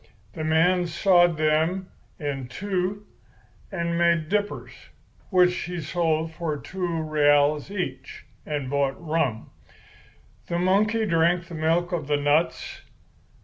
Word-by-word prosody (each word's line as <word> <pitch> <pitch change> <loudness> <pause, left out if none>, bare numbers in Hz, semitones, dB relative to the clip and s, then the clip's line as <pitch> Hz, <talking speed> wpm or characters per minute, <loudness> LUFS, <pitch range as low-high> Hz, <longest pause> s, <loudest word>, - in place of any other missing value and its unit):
The 155 - -5
man 175 +3 +3
sawed 175 -1 +3
them 160 +5 +1 0.3
in 140 -5 -4
two 190 +7 -3 0.7
and 170 -2 -2
made 170 -2 +2
dippers, 205 +1 -2 0.6
which 180 -2 +4
he 175 0 -4
sold 160 0 -1
for 160 -2 -3
two 170 +1 -3
reales 145 0 +3
each 200 -3 -5 0.2
and 145 -3 -3
bought 140 0 0
rum. 155 -9 -2 1.0
The 170 - -1
monkey 210 +5 +2
drank 170 -1 +2
the 170 - -11
milk 165 +3 0
of 160 -5 -3
the 145 -1 +2
nuts. 145 +3 0
170 Hz, 120 wpm, -25 LUFS, 155-180 Hz, 1.0 s, which